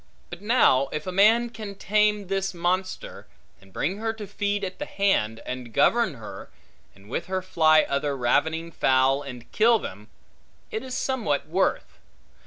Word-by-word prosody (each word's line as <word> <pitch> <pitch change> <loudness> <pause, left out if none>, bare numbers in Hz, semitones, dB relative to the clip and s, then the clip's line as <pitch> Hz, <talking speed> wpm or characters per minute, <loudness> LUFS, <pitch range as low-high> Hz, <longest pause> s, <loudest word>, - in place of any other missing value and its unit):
But 175 +1 -8
now, 205 - +4
if 150 0 -4
a 185 - -3
man 225 +5 +4
can 215 -3 -8
tame 210 +1 +1
this 195 0 -2
monster, 185 +2 -2 0.3
and 100 0 -19
bring 175 - -2
her 225 +1 -2
to 220 -2 -8
feed 205 0 -2
at 185 -1 -5
the 295 - -4
hand, 115 - 0
and 125 -2 -6
govern 190 - +2
her, 115 -3 -10 0.5
and 100 +1 -18
with 115 - -4
her 185 0 -2
fly 155 -4 +4
other 140 0 -2
ravening 160 +7 0
fowl 135 -1 +2
and 125 -4 -10
kill 230 +2 +4
them, 105 - -8 0.6
it 220 - -3
is 260 -1 -5
somewhat 225 - -1
worth. 185 +5 -1
185 Hz, 165 wpm, -25 LUFS, 140-210 Hz, 0.6 s, now